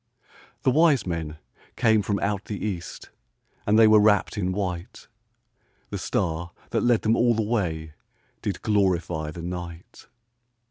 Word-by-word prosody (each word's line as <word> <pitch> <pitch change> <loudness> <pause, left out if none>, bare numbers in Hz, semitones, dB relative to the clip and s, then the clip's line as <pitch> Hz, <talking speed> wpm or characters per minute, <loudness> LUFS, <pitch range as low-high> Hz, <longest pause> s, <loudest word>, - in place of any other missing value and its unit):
The 130 - +4
wise 155 -1 +4
men 80 -3 -4 0.4
came 110 -3 +3
from 100 -1 -1
out 100 0 -1
the 105 - -5
east, 90 -5 -6 0.6
And 105 +1 +4
they 115 - +8
were 110 0 +7
wrapped 105 -1 +3
in 95 -3 -1
white; 90 -3 -4 0.8
The - - -3
star 85 +1 -2 0.2
that - - +1
led 120 -2 +2
them 110 +1 +3
all 120 -1 +3
the 110 - 0
way 85 -9 -2 0.5
Did 95 -3 -4
glorify 90 -7 +1
the 85 +2 -8
night. 90 -1 -7
100 Hz, 145 wpm, -25 LUFS, 85-110 Hz, 0.8 s, they